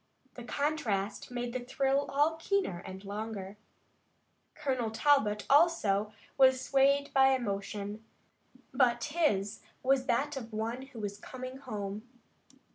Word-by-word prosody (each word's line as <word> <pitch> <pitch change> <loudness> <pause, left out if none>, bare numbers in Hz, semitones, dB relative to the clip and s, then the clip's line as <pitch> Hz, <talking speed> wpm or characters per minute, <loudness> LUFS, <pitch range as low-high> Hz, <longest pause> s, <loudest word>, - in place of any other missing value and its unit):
The 245 - -9
contrast 235 -8 -1
made 245 -1 -4
the 255 - -1
thrill 270 +3 0
all 290 +3 +3
the 320 0 -12
keener 395 - 0
and 190 +1 -8
longer. 205 -1 -5 1.0
Colonel 260 -6 -1
Talbot, 220 -4 +2
also, 245 - +3 0.3
was 260 -1 +6
swayed 275 +2 +2
by 265 0 +6
emotion, 205 -2 -4 0.7
but 240 -3 +3
his 255 - 0 0.2
was 260 0 +2
that 280 +5 +1
of 235 -4 -6
one 230 +5 -3
who 255 -4 -11
was 205 -1 -4
coming 255 +2 -7
home. 215 -4 -6
245 Hz, 125 wpm, -31 LUFS, 210-275 Hz, 1.0 s, was